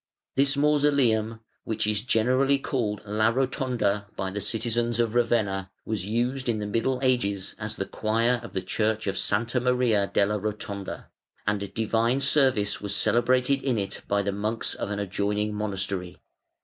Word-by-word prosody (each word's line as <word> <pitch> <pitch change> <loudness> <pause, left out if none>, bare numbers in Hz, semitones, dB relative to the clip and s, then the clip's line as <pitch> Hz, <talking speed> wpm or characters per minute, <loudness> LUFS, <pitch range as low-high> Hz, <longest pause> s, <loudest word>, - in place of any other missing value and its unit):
] - - -65
This 140 +1 +2
mausoleum, 140 -7 +2 0.2
which 110 -1 -1
is 105 -1 +1
generally 130 +4 +3
called 115 -7 -2
La 110 +2 +2
Rotonda 125 -5 0
by 95 0 -3
the 100 +1 -3
citizens 115 +2 0
of 115 -2 +1
Ravenna, 110 -6 +1 0.2
was 100 -4 -3
used 125 +4 0
in 115 - +1
the 105 - -3
Middle 115 +5 0
Ages 100 -7 0
as 110 -1 -4
the 95 - -3
choir 115 +4 +1
of 115 - -10
the 95 - -2
Church 110 0 0
of 100 - 0
S. - - -2 0.3
Maria 125 -5 +2
della 105 +1 +2
Rotonda, 100 -1 -5 0.4
and 100 -1 -1
divine 115 +3 +1
service 135 -7 +2
was 100 -1 -3
celebrated 125 +3 +2
in 130 -4 0
it 100 -2 -3
by 100 0 +1
the 100 - 0
monks 105 +3 -2
of - - -4
an 105 - -2
adjoining 105 +1 -1
monastery. 95 -3 -3
110 Hz, 160 wpm, -26 LUFS, 100-125 Hz, 0.4 s, generally